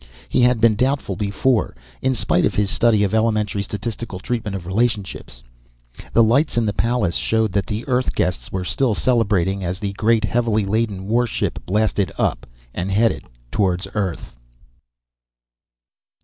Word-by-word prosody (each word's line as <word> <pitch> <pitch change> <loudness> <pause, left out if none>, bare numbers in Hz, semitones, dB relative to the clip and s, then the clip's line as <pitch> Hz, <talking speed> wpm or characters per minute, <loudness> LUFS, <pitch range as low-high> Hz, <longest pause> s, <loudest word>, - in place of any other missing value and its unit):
He - - +2
had 125 -1 +4
been 115 0 +5
doubtful 130 -3 0
before, 105 +5 0 0.3
in 130 0 +1
spite 90 - +1
of - - +1
his 100 -2 +1
study 110 -3 +3
of 100 0 0
elementary 105 -2 +1
statistical 105 +1 -5
treatment 110 0 -3
of 90 -3 -6
relationships. 100 - -2 0.7
The 115 - +6
lights 125 +6 +2
in 115 - +2
the 105 - 0
palace 115 -7 0
showed 110 +2 +1
that 100 +1 -1
the 110 +2 -4
Earth 130 -1 0
guests 90 - -1
were 95 -1 -2
still 110 +4 +1
celebrating 100 -6 +1
as 90 +1 -2
the 100 -2 -3
great, 110 +2 +2
heavily 110 0 +1
laden 100 -2 -1
warship 120 +2 0
blasted 105 -1 +1
up - - -1 0.3
and 90 +2 -3
headed 110 +3 +1 0.3
toward 95 -2 0
Earth. 95 - -3
105 Hz, 150 wpm, -21 LUFS, 100-115 Hz, 0.7 s, The